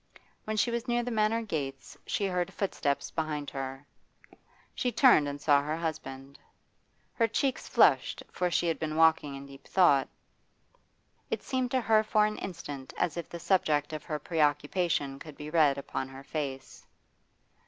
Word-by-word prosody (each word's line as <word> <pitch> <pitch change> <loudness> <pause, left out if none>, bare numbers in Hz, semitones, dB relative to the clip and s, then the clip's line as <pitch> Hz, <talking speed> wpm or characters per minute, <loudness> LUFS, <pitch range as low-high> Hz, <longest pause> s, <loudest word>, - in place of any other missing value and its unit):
When 215 0 -2
she 235 - +2
was 235 +2 -3
near 240 0 +1
the 245 - -3
Manor 220 +1 +1
gates 140 -9 -5
she 200 - 0
heard 180 -2 -1
footsteps 145 -8 -2
behind 150 -3 -3
her. 135 0 -5 0.9
She 250 - -1
turned 240 - +5
and 145 0 -4
saw 145 -1 +4
her 150 +2 -2
husband. 140 -4 -5 0.7
Her 230 - +2
cheeks 265 +4 -1
flushed, - - +3
for 180 0 0
she 175 - +1
had 165 - 0
been 155 -1 -3
walking 160 -3 +3
in 135 0 -8
deep 140 0 -14
thought. 145 -8 +4 1.2
It - - -2
seemed 255 -2 -1
to 260 +1 +1
her 220 -2 +4
for 215 -1 +3
an 215 0 -3
instant 145 -8 -7
as 160 - 0
if 170 - -5
the 170 - -7
subject 155 -5 +1
of 155 -3 -5
her 155 - -2
preoccupation 150 -2 0
could 155 -3 -11
be 150 +1 -7
read 150 -4 +4
upon 135 -1 -4
her 135 +1 -11
face. 135 -3 -5
155 Hz, 165 wpm, -29 LUFS, 140-200 Hz, 1.2 s, turned